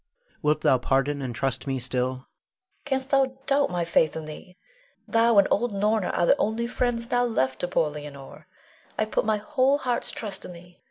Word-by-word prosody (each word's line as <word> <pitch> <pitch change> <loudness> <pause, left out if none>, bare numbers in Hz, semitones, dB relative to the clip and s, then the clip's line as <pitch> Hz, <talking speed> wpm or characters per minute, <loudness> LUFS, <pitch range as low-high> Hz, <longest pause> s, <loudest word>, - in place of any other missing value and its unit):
Wilt 150 -1 +1
thou 130 - +4
pardon 135 +3 0
and 125 -3 -4
trust 130 +1 -2
me 135 -1 -1
still? 125 0 -1
Leonore. 130 0 -9 0.6
Canst 265 -1 -2
thou 265 -1 +2
doubt 280 0 +2
my 175 -1 -1
faith 160 -1 +2
in 160 -1 -5
thee? 180 +4 -11 0.5
Thou 230 -1 +3
and 200 - +6
old 240 +2 +1
Norna 210 0 +1
are 175 - +1
the - - +4
only 225 +2 0
friends 235 -1 -1
now 245 0 +3
left 130 - 0
to 180 - -1
poor 160 -3 +1
Leonore. 145 -2 -10 0.5
I 215 - +1
put 215 - -1
my 215 -1 +2
whole 270 +4 +2
heart's 250 -4 -1
trust 205 -4 -4
in 180 - -8
thee. 175 +1 -15
185 Hz, 200 wpm, -26 LUFS, 145-235 Hz, 0.6 s, and